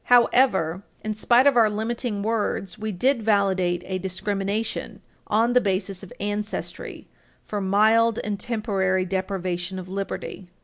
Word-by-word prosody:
However, 230 Hz, -8 st, +4 dB, 0.2 s
in 215 Hz, -, -2 dB
spite 240 Hz, +4 st, +4 dB
of 285 Hz, -2 st, +5 dB
our 225 Hz, -3 st, +5 dB
limiting 220 Hz, 0 st, -2 dB
words, 210 Hz, -4 st, -1 dB
we 215 Hz, 0 st, -4 dB
did 245 Hz, +7 st, +1 dB
validate 190 Hz, -4 st, +1 dB
a 185 Hz, 0 st, -3 dB
discrimination 195 Hz, +3 st, -3 dB, 0.2 s
on 230 Hz, +3 st, +2 dB
the 250 Hz, -, +5 dB
basis 195 Hz, -2 st, -1 dB
of 195 Hz, -, -11 dB
ancestry 205 Hz, +1 st, -4 dB, 0.4 s
for 205 Hz, -1 st, -3 dB
mild 220 Hz, +4 st, +4 dB
and 205 Hz, -1 st, -3 dB
temporary 195 Hz, -5 st, 0 dB
deprivation 185 Hz, -1 st, -3 dB
of 185 Hz, -1 st, -6 dB
liberty. 195 Hz, -1 st, -5 dB
205 Hz, 135 wpm, -24 LUFS, 190-225 Hz, 0.4 s, of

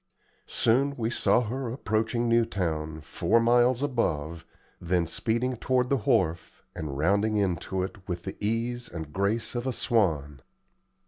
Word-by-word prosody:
Soon 135 Hz, +5 st, +2 dB
we 115 Hz, -1 st, -1 dB
saw 120 Hz, -, +3 dB
her 125 Hz, +2 st, -3 dB
approaching 115 Hz, 0 st, -1 dB
Newtown, 85 Hz, -9 st, 0 dB
four 110 Hz, +9 st, +1 dB
miles 120 Hz, +2 st, +3 dB
above, 85 Hz, -, -1 dB, 0.3 s
then 90 Hz, 0 st, +1 dB
speeding 115 Hz, +9 st, -1 dB
toward 125 Hz, +1 st, +1 dB
the 140 Hz, -, +4 dB
wharf, 95 Hz, -10 st, 0 dB
and 75 Hz, -3 st, -5 dB
rounding 100 Hz, +7 st, +2 dB
into 95 Hz, -1 st, -1 dB
it, 95 Hz, 0 st, -8 dB
with 85 Hz, -2 st, -4 dB
the 95 Hz, -, -5 dB
ease 115 Hz, +3 st, -1 dB
and 80 Hz, -3 st, -7 dB
grace 100 Hz, +5 st, 0 dB
of 120 Hz, +1 st, -3 dB
a 130 Hz, -, 0 dB
swan. 80 Hz, -, 0 dB
110 Hz, 140 wpm, -27 LUFS, 85-120 Hz, 0.3 s, the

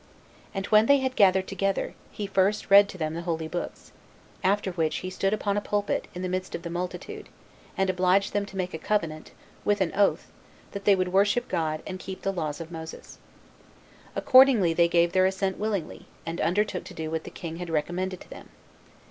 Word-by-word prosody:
And 195 Hz, -2 st, -3 dB
when 215 Hz, +1 st, +5 dB
they 280 Hz, -, +6 dB
had 260 Hz, -1 st, -2 dB
gathered 190 Hz, -1 st, +4 dB
together, 195 Hz, 0 st, -1 dB, 0.2 s
he 210 Hz, -, -4 dB
first 195 Hz, +1 st, +1 dB
read 200 Hz, 0 st, +8 dB
to 185 Hz, -, -8 dB
them 155 Hz, -2 st, -2 dB
the 170 Hz, -, -4 dB
holy 165 Hz, -2 st, -2 dB
books; 175 Hz, +2 st, -6 dB, 0.5 s
after 195 Hz, 0 st, +1 dB
which 165 Hz, -3 st, -1 dB
he 185 Hz, -, -4 dB
stood 195 Hz, +1 st, 0 dB
upon 205 Hz, -1 st, 0 dB
a -, -, +1 dB
pulpit, 205 Hz, 0 st, -1 dB
in 180 Hz, -, -5 dB
the -, -, -1 dB
midst 185 Hz, 0 st, -3 dB
of -, -, -7 dB
the 170 Hz, -, -5 dB
multitude, 180 Hz, -, -5 dB, 0.5 s
and 195 Hz, -, +2 dB
obliged 185 Hz, +1 st, +2 dB
them 205 Hz, -, +1 dB
to 195 Hz, -, -10 dB
make 185 Hz, -1 st, -2 dB
a 160 Hz, -, -4 dB
covenant, 160 Hz, -7 st, -2 dB, 0.3 s
with 205 Hz, 0 st, +2 dB
an 185 Hz, -4 st, 0 dB
oath, 200 Hz, 0 st, +1 dB, 0.4 s
that 200 Hz, -1 st, -7 dB
they 200 Hz, -, +6 dB
would 185 Hz, -1 st, -1 dB
worship 205 Hz, +5 st, +3 dB
God, 155 Hz, -1 st, -2 dB
and 185 Hz, -, -6 dB
keep 190 Hz, 0 st, -8 dB
the 195 Hz, -, 0 dB
laws 155 Hz, -5 st, -3 dB
of 165 Hz, 0 st, -8 dB
Moses. 160 Hz, -1 st, -9 dB, 1.0 s
Accordingly, 255 Hz, -10 st, +6 dB
they 170 Hz, +1 st, +4 dB
gave 170 Hz, 0 st, +3 dB
their 185 Hz, +1 st, +4 dB
assent 190 Hz, 0 st, -2 dB
willingly, 205 Hz, -6 st, -3 dB, 0.2 s
and 165 Hz, +1 st, -3 dB
undertook 190 Hz, +2 st, 0 dB
to -, -, -10 dB
do 160 Hz, -1 st, -4 dB
what 160 Hz, -1 st, -2 dB
the -, -, -8 dB
king 165 Hz, -1 st, -7 dB
had 175 Hz, -1 st, -6 dB
recommended 175 Hz, +4 st, -2 dB
to -, -, -14 dB
them. -, -, -11 dB
185 Hz, 205 wpm, -27 LUFS, 170-200 Hz, 1.0 s, read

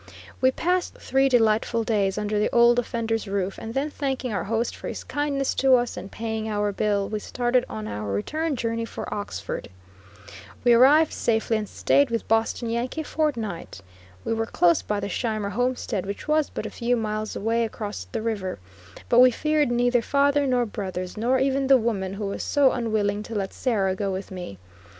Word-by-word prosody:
We 260 Hz, -, +6 dB
passed 355 Hz, +6 st, -1 dB
three 270 Hz, +1 st, +1 dB
delightful 225 Hz, -1 st, +2 dB
days 205 Hz, -3 st, 0 dB
under 210 Hz, 0 st, -1 dB
the 210 Hz, -, +2 dB
Old 240 Hz, 0 st, +5 dB
Offender's 225 Hz, -2 st, -2 dB
roof, 195 Hz, -1 st, -2 dB
and 225 Hz, +1 st, -7 dB
then 285 Hz, +3 st, -1 dB
thanking 265 Hz, -5 st, -2 dB
our 200 Hz, -, -2 dB
host 225 Hz, +3 st, -1 dB
for -, -, -8 dB
his -, -, -5 dB
kindness 285 Hz, -2 st, -1 dB
to 265 Hz, -1 st, +5 dB
us, 245 Hz, -1 st, 0 dB
and 185 Hz, +2 st, -8 dB
paying 220 Hz, -1 st, -3 dB
our 205 Hz, -1 st, 0 dB
bill, 200 Hz, 0 st, 0 dB
we 215 Hz, -, -3 dB
started 245 Hz, +3 st, 0 dB
on 110 Hz, -1 st, -5 dB
our 105 Hz, -1 st, -4 dB
return 305 Hz, -, -1 dB
journey 230 Hz, -1 st, -2 dB
for -, -, -6 dB
Oxford. 205 Hz, 0 st, -5 dB, 0.9 s
We 240 Hz, -1 st, +6 dB
arrived 285 Hz, +6 st, +6 dB
safely, 225 Hz, 0 st, 0 dB
and 210 Hz, -2 st, -4 dB
staid 280 Hz, -2 st, +2 dB
with 230 Hz, -1 st, -2 dB
Boston 225 Hz, +2 st, +1 dB
Yankee 245 Hz, +7 st, -2 dB
a -, -, -5 dB
fortnight. 230 Hz, -, -3 dB, 0.4 s
We -, -, 0 dB
were 225 Hz, 0 st, -1 dB
close 175 Hz, -5 st, +3 dB
by 210 Hz, -1 st, -2 dB
the 200 Hz, -, -2 dB
Scheimer 215 Hz, -1 st, -2 dB
homestead, 245 Hz, -3 st, -1 dB
which 200 Hz, +7 st, -6 dB
was 305 Hz, -1 st, +2 dB
but -, -, -5 dB
a -, -, -5 dB
few 245 Hz, 0 st, 0 dB
miles 215 Hz, -1 st, -3 dB
away 230 Hz, +3 st, 0 dB
across 205 Hz, -, -5 dB
the -, -, -3 dB
river; 205 Hz, -5 st, -2 dB, 0.5 s
but 240 Hz, -, +4 dB
we 255 Hz, 0 st, +9 dB
feared 305 Hz, +3 st, +1 dB
neither 245 Hz, 0 st, +2 dB
father 280 Hz, +3 st, +2 dB
nor 250 Hz, -2 st, +2 dB
brothers, 185 Hz, -4 st, -5 dB
nor 240 Hz, +4 st, +1 dB
even 270 Hz, +1 st, +1 dB
the 270 Hz, 0 st, +7 dB
woman 200 Hz, -5 st, -2 dB
who 205 Hz, +1 st, -4 dB
was 200 Hz, -, -3 dB
so 285 Hz, -2 st, +3 dB
unwilling 215 Hz, -3 st, 0 dB
to 225 Hz, +1 st, -7 dB
let 195 Hz, -2 st, -2 dB
Sarah 200 Hz, -7 st, 0 dB
go 195 Hz, +1 st, -2 dB
with 190 Hz, +1 st, -5 dB
me. 180 Hz, -, -7 dB
225 Hz, 190 wpm, -25 LUFS, 205-255 Hz, 0.9 s, we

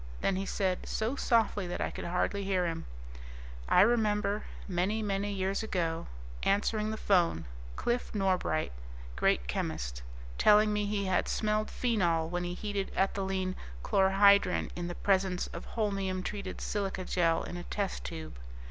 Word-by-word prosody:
Then 195 Hz, -, +1 dB
he 195 Hz, +1 st, -2 dB
said, 185 Hz, -2 st, -1 dB
so 220 Hz, +5 st, -1 dB
softly 225 Hz, -7 st, +2 dB
that 175 Hz, -, -4 dB
I -, -, -1 dB
could -, -, -6 dB
hardly 180 Hz, +3 st, 0 dB
hear 190 Hz, -2 st, +1 dB
him, 165 Hz, -1 st, -3 dB, 0.8 s
"I -, -, +6 dB
remember, 210 Hz, -2 st, +2 dB, 0.2 s
many, 195 Hz, +4 st, 0 dB
many 200 Hz, 0 st, -1 dB
years 195 Hz, 0 st, -1 dB
ago, 170 Hz, -6 st, -2 dB, 0.3 s
answering 210 Hz, +2 st, +1 dB
the 220 Hz, -, -3 dB
phone, 175 Hz, -, +2 dB, 0.3 s
Cliff 240 Hz, -, -1 dB
Norbright 185 Hz, -5 st, +1 dB, 0.4 s
great 60 Hz, 0 st, +2 dB
chemist -, -, -3 dB, 0.4 s
telling 210 Hz, 0 st, +6 dB
me 210 Hz, 0 st, 0 dB
he 200 Hz, -1 st, -1 dB
had 185 Hz, -1 st, +1 dB
smelled 215 Hz, 0 st, 0 dB
phenol 175 Hz, -10 st, +1 dB
when 175 Hz, +1 st, -2 dB
he 175 Hz, 0 st, -3 dB
heated 200 Hz, -1 st, -3 dB
ethylene 190 Hz, -1 st, 0 dB, 0.3 s
chlorohydrin 195 Hz, -1 st, +4 dB
in 175 Hz, 0 st, -3 dB
the 175 Hz, -, -5 dB
presence 190 Hz, -2 st, +1 dB
of -, -, -7 dB
holmium 195 Hz, -4 st, -1 dB
treated 200 Hz, -2 st, -5 dB
silica 195 Hz, -3 st, -2 dB
gel 165 Hz, -3 st, +2 dB
in -, -, -6 dB
a 175 Hz, -, -5 dB
test 200 Hz, -2 st, -3 dB
tube. 160 Hz, -, -7 dB
195 Hz, 150 wpm, -31 LUFS, 180-210 Hz, 0.8 s, I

